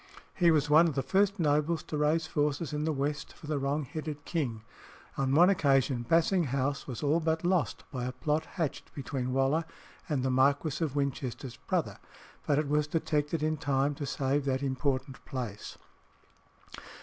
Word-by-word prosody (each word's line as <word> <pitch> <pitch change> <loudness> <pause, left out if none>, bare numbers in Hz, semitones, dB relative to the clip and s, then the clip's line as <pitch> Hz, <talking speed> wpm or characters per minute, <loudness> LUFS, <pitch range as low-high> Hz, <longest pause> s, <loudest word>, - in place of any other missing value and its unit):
He 175 -2 +4
was 150 -3 +3
one 155 +3 +6
of 155 - -2
the 135 - 0
first 200 +5 +2
nobles 150 +1 +1
to - - -5
raise 150 +2 +2
forces 150 -1 -1
in 150 +1 -1
the 160 - +1
West 145 +1 -2
for - - -14
the 150 -1 -1
wrong 140 +2 -1
headed 150 0 -6
king. 125 -10 -2 0.5
On 135 0 +1
one 175 +3 +7
occasion 135 -9 +2
Basing 170 +2 +3
House 140 +1 -1
was 125 -1 -5
all 150 +3 +3
but 160 0 0
lost 180 -3 +1
by 125 -3 -3
a 125 - -2
plot 150 +5 -1
hatched 160 -5 -3
between 130 -2 -3
Waller 135 +5 +2 0.5
and 140 -4 0
the 130 - +1
Marquis 140 +4 +2
of 145 -4 -2
Winchester's 135 -2 -3
brother, - - -2 0.5
but 145 - +3
it 150 -1 +1
was 150 +1 +1
detected 150 -1 -1
in 155 0 +1
time 140 0 +1
to 140 0 -5
save 140 +2 0
that 135 0 0
important 135 0 -2
place. 120 -6 -6
145 Hz, 175 wpm, -30 LUFS, 135-155 Hz, 0.5 s, one